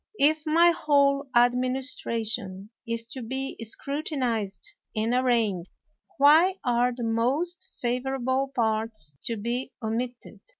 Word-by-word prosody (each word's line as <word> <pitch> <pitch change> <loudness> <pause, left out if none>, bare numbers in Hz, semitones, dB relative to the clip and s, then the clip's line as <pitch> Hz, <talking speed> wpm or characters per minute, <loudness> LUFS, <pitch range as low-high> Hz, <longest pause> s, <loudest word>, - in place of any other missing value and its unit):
If 310 +2 +2
my 335 +3 +6
whole 280 -3 +2
administration 240 -5 0 0.2
is 230 0 -2
to 260 - -6
be 265 +3 -4
scrutinized 235 - -3 0.2
and 220 +2 0
arraigned, 230 -8 +1 0.5
why 315 +7 +6
are 245 0 +2
the 240 0 -6
most 285 +12 0 0.2
favorable 260 +2 -1
parts 220 - -1
to 230 - -2
be 240 +5 -3
omitted? 240 +2 -4
245 Hz, 110 wpm, -26 LUFS, 225-275 Hz, 0.5 s, my